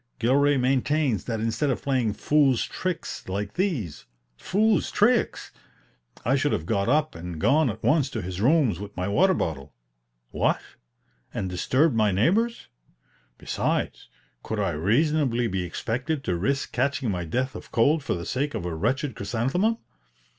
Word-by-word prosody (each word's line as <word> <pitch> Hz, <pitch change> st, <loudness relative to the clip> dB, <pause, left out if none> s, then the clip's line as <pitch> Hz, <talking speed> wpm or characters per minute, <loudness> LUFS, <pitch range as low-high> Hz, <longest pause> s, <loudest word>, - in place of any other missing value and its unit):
Gilray 140 Hz, +4 st, +3 dB
maintains 130 Hz, -, +1 dB
that 115 Hz, -2 st, -2 dB
instead 115 Hz, +6 st, 0 dB
of 130 Hz, -, -2 dB
playing 130 Hz, -6 st, +1 dB
"fool's 135 Hz, +1 st, +2 dB
tricks" 185 Hz, -, -4 dB
like 100 Hz, +2 st, -3 dB
these 140 Hz, -, -2 dB, 0.3 s
("fool's 210 Hz, -, +1 dB
tricks!") 235 Hz, +3 st, +1 dB, 0.7 s
I 130 Hz, +4 st, +3 dB
should 145 Hz, +1 st, +1 dB
have 80 Hz, -, -2 dB
got 100 Hz, +3 st, 0 dB
up 155 Hz, +2 st, +2 dB
and 85 Hz, -1 st, -7 dB
gone 145 Hz, -, +3 dB
at 110 Hz, +1 st, -6 dB
once 150 Hz, -3 st, +3 dB
to 110 Hz, -, -4 dB
his 90 Hz, +1 st, -5 dB
rooms 130 Hz, -, +3 dB
with 100 Hz, 0 st, -9 dB
my 90 Hz, +1 st, -1 dB
water 185 Hz, -, +3 dB
bottle. 75 Hz, -, -4 dB, 0.6 s
What? -, -, +1 dB, 0.8 s
and 95 Hz, -, -2 dB
disturbed 130 Hz, -, +2 dB
my 110 Hz, -2 st, +3 dB
neighbors? 200 Hz, -, +1 dB, 0.7 s
Besides, -, -, -2 dB, 0.3 s
could 110 Hz, -, -4 dB
I 100 Hz, -4 st, +1 dB
reasonably 120 Hz, -, +1 dB
be 95 Hz, -4 st, -1 dB
expected 130 Hz, -, -3 dB
to 90 Hz, -, -1 dB
risk 135 Hz, +11 st, -1 dB
catching 140 Hz, -5 st, 0 dB
my 90 Hz, -2 st, -2 dB
death 130 Hz, +10 st, -2 dB
of -, -, -10 dB
cold 145 Hz, +6 st, +3 dB
for -, -, -1 dB
the 85 Hz, -1 st, -5 dB
sake 145 Hz, +3 st, -2 dB
of 85 Hz, -, -4 dB
a 85 Hz, -, -3 dB
wretched 125 Hz, -, -1 dB
chrysanthemum? 130 Hz, -, 0 dB
125 Hz, 155 wpm, -25 LUFS, 100-150 Hz, 0.8 s, Gilray